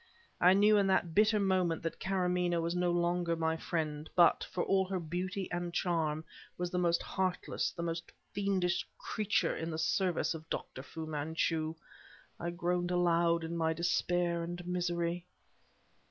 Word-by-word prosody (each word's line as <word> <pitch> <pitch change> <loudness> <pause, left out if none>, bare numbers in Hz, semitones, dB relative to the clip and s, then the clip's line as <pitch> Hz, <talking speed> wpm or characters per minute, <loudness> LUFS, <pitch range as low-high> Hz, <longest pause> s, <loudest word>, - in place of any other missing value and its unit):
I 180 +1 +7
knew 210 +2 +5
in 200 -1 +3
that 175 -3 +2
bitter 215 +2 +4
moment 185 -5 +1
that 165 - -3
Karamaneh 180 -2 +1
was 165 +1 -1
no 180 0 +1
longer 175 0 +1
my 160 0 0
friend; 155 -2 -3
but, 175 -2 +5
for 175 - -1
all 195 0 +3
her 190 0 -2
beauty 180 +3 -3
and 175 0 -2
charm, 160 -3 0 0.3
was 180 0 -2
the 180 - 0
most 170 -1 +2
heartless, 185 -2 -1
the 170 - -6
most 165 0 -4 0.2
fiendish 190 -3 +1
creature 210 -1 0
in 165 - -4
the 160 - -3
service 190 -2 +1
of 160 0 -9
Dr. 130 - -4
Fu 160 +4 -7
Manchu. 155 +1 -1 0.6
I 170 - -2
groaned 175 0 -1
aloud 170 -1 +2
in 165 +1 -4
my 160 -1 +1
despair 170 +1 +1
and 175 +1 -5
misery. 175 -1 -1
175 Hz, 160 wpm, -33 LUFS, 165-180 Hz, 0.6 s, I